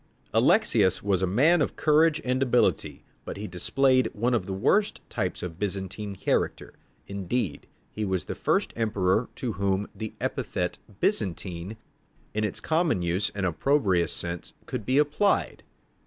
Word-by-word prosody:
Alexius 115 - +3
was 100 -3 +1
a 95 - +2
man 145 - +4
of - - 0
courage 155 +1 +4
and 130 +1 0
ability, 125 -2 +1 0.2
but - - -6
he 105 - -5
displayed 130 +8 +2
one 120 +4 0
of 120 - 0
the - - -4
worst 195 - +2
types 95 -6 -2
of 85 -1 -6
Byzantine 100 +1 -4
character. - - -1 0.3
Indeed, 100 -1 -3 0.2
he 110 - -4
was 95 -4 -1
the - - -4
first - - 0
emperor 110 -1 +1
to 125 - -3
whom 100 +1 0
the 110 -1 -6
epithet - - -2 0.2
"Byzantine," 90 +2 -1 0.6
in 110 - -1
its 105 - -2
common 160 - +1 0.3
and 100 -2 -1
opprobrious 95 - +2
sense 85 -1 -4
could 125 -5 -5
be 130 +2 +2
applied. 150 +8 +2
105 Hz, 145 wpm, -27 LUFS, 95-130 Hz, 0.6 s, man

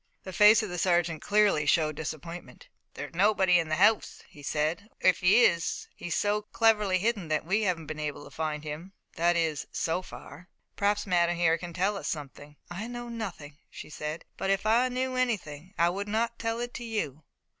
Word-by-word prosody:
The 190 - -8
face 210 +2 +6
of 215 - -4
the 180 0 -4
sergeant 170 -3 +1
clearly 205 -8 +2
showed 155 0 +2
disappointment. 165 - -7 0.3
"There's - - -7
nobody 190 -1 +4
in 165 -2 -2
the 155 - +1
house," 205 +5 +2
he 145 - -15
said, 155 +8 -2
"or, - - +7
if 180 - -12
he 190 +7 +5
is 170 0 0
he's 175 - -4
so 205 0 +1
cleverly 210 -3 +2
hidden, 205 -2 -1
that 155 0 -1
we 195 +6 +1
haven't 180 -6 -1
been 155 +1 -6
able 150 -1 -4
to - - -13
find 155 -1 -3
him 155 +5 -7 0.2
that 175 +1 +2
is 160 -3 -1
so 165 +3 -1
far. 175 -1 -12 0.3
Perhaps 205 +1 +1
Madame 175 -2 +2
here 165 -1 +3
can 175 +1 -7
tell 190 +4 0
us - - -5
something." 145 -1 -6 0.2
"I 200 +6 -5
know 240 0 -6
nothing," 180 -11 -7
she - - -10
said, 150 +2 -5
"but 195 - -2
if 195 +1 +1
I 235 +4 +3
knew 255 +1 -2
anything 190 - -2
I 170 +1 +3
would 200 +3 -4
not 230 +2 -1
tell 225 0 -2
it 240 0 -4
to 240 - -6
you." 210 - -3
180 Hz, 200 wpm, -28 LUFS, 160-210 Hz, 0.3 s, or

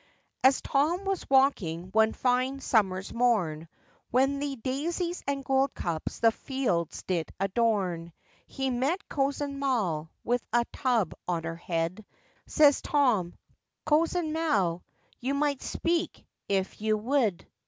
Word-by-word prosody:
] - - -44
AS 265 +1 +5
Tom 325 +8 +1
was 390 -1 -1
a - - -11
walking 190 - +2
one 220 +2 +4
fine 255 +2 +1
summer's 195 -7 +1
morn, 185 -10 +1 0.4
When 270 +3 +2
the 285 -1 -2
dazies 330 +8 -2
and 275 -1 -2
goldcups 265 - -1
the 230 -1 +6
fields 225 - -2
did 170 -4 -2
adorn; 195 -5 0 0.4
He 270 -1 -2
met 275 +10 -1
Cozen 280 0 -1
Mal, 195 - 0
with 245 +1 0
a 235 +1 +3
tub 235 - +1
on 170 -2 -1
her 165 0 -4
head, 170 +3 -3 0.4
Says 295 -3 +5
Tom, 240 -12 +1 0.5
'Cozen 315 +1 +1
Mal, 200 - +1 0.4
you 265 +3 -1
might 285 -1 0
speak 335 +1 -2 0.2
if 195 0 -1
you 215 0 +2
we'd. 225 -5 0
245 Hz, 130 wpm, -28 LUFS, 185-280 Hz, 0.5 s, the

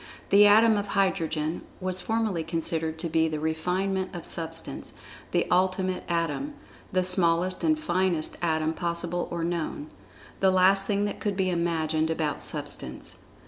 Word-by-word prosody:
The 205 +1 +8
atom 220 +1 +6
of 205 0 -2
Hydrogen 165 -5 0 0.2
was 185 -1 -3
formerly 220 -5 -1
considered 160 -1 -2
to 170 - -3
be 160 0 +2
the 155 -1 -3
refinement 185 +5 -1
of 170 - -7
Substance—the 165 0 -4
Ultimate 185 0 +1
Atom—the 185 - -3
smallest 180 0 +3
and 315 -1 +3
finest 185 - +1
Atom 160 -2 +1
possible 170 +1 -2
or 170 -1 -3
known—the 170 +2 -3
last 190 +1 +5
thing 205 -1 +1
that 205 - -4
could 205 -3 -2
be 185 -1 +1
imagined 160 -2 0
about 155 -3 -1
Substance. - - -5
175 Hz, 135 wpm, -27 LUFS, 160-190 Hz, 0.2 s, The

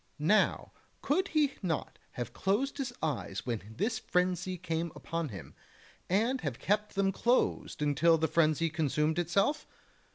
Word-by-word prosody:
Now 175 +9 +2 0.3
could 380 +1 +1
he 300 -5 +2
not 170 -6 -3
have 120 -2 -5
closed 260 +9 0
his 260 -3 -2
eyes 155 -3 -2
when 110 -3 -4
this 220 - 0
frenzy 180 -1 0
came 165 -1 -2
upon 165 -2 -3
him, 95 -7 -9 0.6
and 230 +8 +2
have 140 -6 -3
kept 210 +1 0
them 195 0 +2
closed 235 -7 +1
until 155 +3 +4
the 160 0 +1
frenzy 160 0 +2
consumed 155 +1 +1
itself? 195 - +1
170 Hz, 140 wpm, -31 LUFS, 155-210 Hz, 0.6 s, until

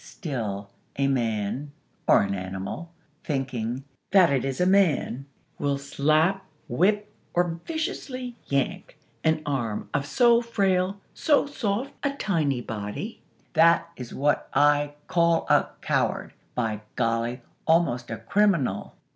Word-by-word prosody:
Still, 105 - -5 0.2
a 140 0 +1
man, 120 +2 -1 0.3
or - - +6
an 100 0 -1
animal 95 - -5 0.3
thinking 130 -3 -2 0.3
that 185 -7 +6
it 135 - +1
is 135 -1 -2
a 180 - +3
man 170 -8 +2 0.3
will 140 -1 +1
slap, 155 +7 +2 0.2
whip, 205 - +1 0.2
or 175 -1 +1
viciously 280 -7 -3
yank 140 -1 -1 0.3
an 160 -1 +2
arm 120 -7 -2
of 140 -1 0
so 235 +8 +5
frail, 195 -4 +1
so 295 -3 +3
soft 260 -1 -2
a 280 -1 0
tiny 155 - 0
body! 110 - -5 0.3
That 170 0 +4
is 125 -2 -8
what 145 +2 0
I 145 0 +4
call 170 -1 +2
a - - +4
coward!! - - 0 0.2
By 110 -3 -1
golly! 115 +1 0 0.3
almost 160 -8 +2
a 115 - -3
_criminal! 145 - +1
145 Hz, 125 wpm, -26 LUFS, 120-190 Hz, 0.3 s, or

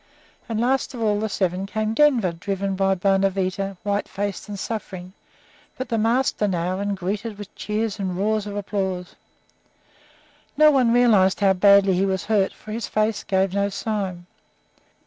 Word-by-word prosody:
And 225 -1 -2
last 260 +2 0
of 210 -3 0
the 220 - 0
seven 190 0 -1
came 215 +1 -2
Denver, 245 - +3
driven 195 +3 -3
by 195 0 +2
Bonavita, 195 0 0
white 205 0 -1
faced 205 +1 -4
and 205 - -5
suffering, 190 -4 -6 0.6
but 260 -1 -5
the 230 -2 0
master 230 -1 +1
now, 180 0 -1
and 200 0 -2
greeted 200 +4 -4
with 205 -1 -10
cheers 215 0 -3
and 185 -2 -3
roars 210 +1 0
of 205 - -6
applause. 190 -3 -3 1.4
No 305 0 +7
one 255 -5 +3
realized 215 -6 +4
how 195 -1 +5
badly 200 0 +5
he 190 +2 +1
was 190 -1 -1
hurt, 205 -3 +1
for 215 - -12
his 225 +2 -3
face 215 -1 0
gave 190 -1 0
no 200 0 +1
sign. 195 -4 -3
200 Hz, 160 wpm, -23 LUFS, 190-220 Hz, 1.4 s, No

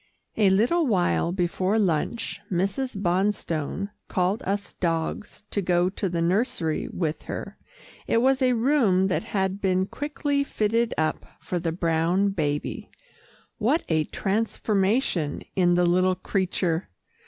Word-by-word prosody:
A 205 -3 +4
little 245 - +3
while 175 - +2
before 185 +3 0
lunch, 200 +3 -1
Mrs. 195 +6 -1
Bonstone 190 -1 -1 0.2
called 185 +3 0
us 200 +1 -2
dogs 165 +5 -3
to 200 - 0
go 180 0 +2
to 195 0 -3
the 170 -1 -1
nursery 175 -3 0
with 160 -3 -2
her. - - -6 0.5
It - - +2
was 265 +3 +3
a 255 -1 +4
room 225 -7 +3
that 190 - -1
had 195 -2 -1
been 185 -1 +2
quickly 285 +3 -1
fitted 230 -2 0
up 155 0 -1
for 180 - -3
the 165 -1 -1
brown 170 +3 +1
baby. 150 -6 -2 0.7
What 260 +10 +2
a 160 -2 +2
transformation 200 - 0
in 175 -2 +3
the 175 0 +3
little 185 +1 +3
creature! 180 - -1
190 Hz, 130 wpm, -25 LUFS, 175-215 Hz, 0.7 s, A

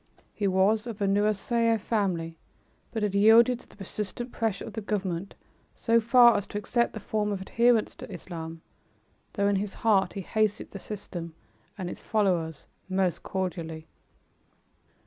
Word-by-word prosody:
He 205 - -1
was 200 +4 +2
of 230 -2 -6
a 200 - +1
Nusairiyeh 215 +3 +2
family 185 -7 -1 0.6
but 220 -2 -2
had 205 -2 0
yielded 225 +4 +6
to - - -19
the - - -18
persistent 210 +4 -5
pressure 225 -4 -2
of - - -8
the 220 - -4
government 195 -3 -3 0.4
so 230 0 +3
far 235 +1 +7
as 200 - -1
to - - -5
accept 235 +4 0
the 220 - -5
form 210 0 -1
of 200 - -2
adherence 235 +2 +2
to - - -9
Islam, 165 -3 -7 0.7
though 200 -1 +1
in 200 -1 +2
his 200 0 -3
heart 200 -4 +4
he 200 - -4
hated 215 +2 -1
the 195 - -7
system 175 -5 -7 0.4
and 185 -3 -4
its - - -6
followers 175 -8 0 0.2
most 185 -2 0
cordially. 165 -4 -4
205 Hz, 160 wpm, -28 LUFS, 185-220 Hz, 0.7 s, far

